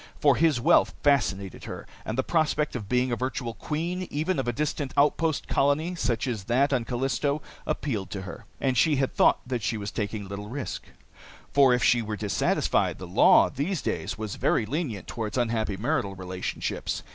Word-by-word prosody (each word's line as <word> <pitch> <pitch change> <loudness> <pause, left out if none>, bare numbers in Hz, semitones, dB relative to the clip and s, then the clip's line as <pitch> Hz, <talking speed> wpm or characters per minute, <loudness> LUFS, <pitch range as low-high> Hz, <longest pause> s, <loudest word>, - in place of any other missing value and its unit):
For 140 -3 +5
his 155 -4 +3
wealth - - +4
fascinated 100 - +1
her, - - -7 0.2
and 110 - -3
the 130 - +2
prospect 155 -2 +1
of 105 -5 -5
being 125 0 +2
a - - +1
virtual 125 -1 -3
queen, 170 - -3
even 155 +3 -1
of 130 - -2
a - - +2
distant 145 +1 -2
outpost 150 +2 +2
colony 145 +5 +1
such 120 -10 -1
as 115 -7 -3
that 135 +5 +2
on 125 -3 +1
Callisto, 135 +4 0 0.3
appealed 110 -10 -2
to 95 -2 -5
her. 95 - -9
And 130 -2 +1
she 150 +5 +4
had 135 -1 0
thought - - +4
that 125 -2 -2
she 110 - -1
was 100 -1 -5
taking 105 -1 -3
little 100 +1 -6
risk, 135 +2 -5 0.7
for 140 -2 +6
if 125 0 +2
she 120 - +4
were 110 -1 -4
dissatisfied, 105 0 +1
the - - -7
law - - +5
these 155 +5 -2
days - - -2
was 110 -2 -5
very 110 - +2
lenient 120 - -3
toward 110 0 -4
unhappy 110 -4 0
marital 120 -3 -1
relationships. 95 0 -4
125 Hz, 185 wpm, -27 LUFS, 110-145 Hz, 0.7 s, for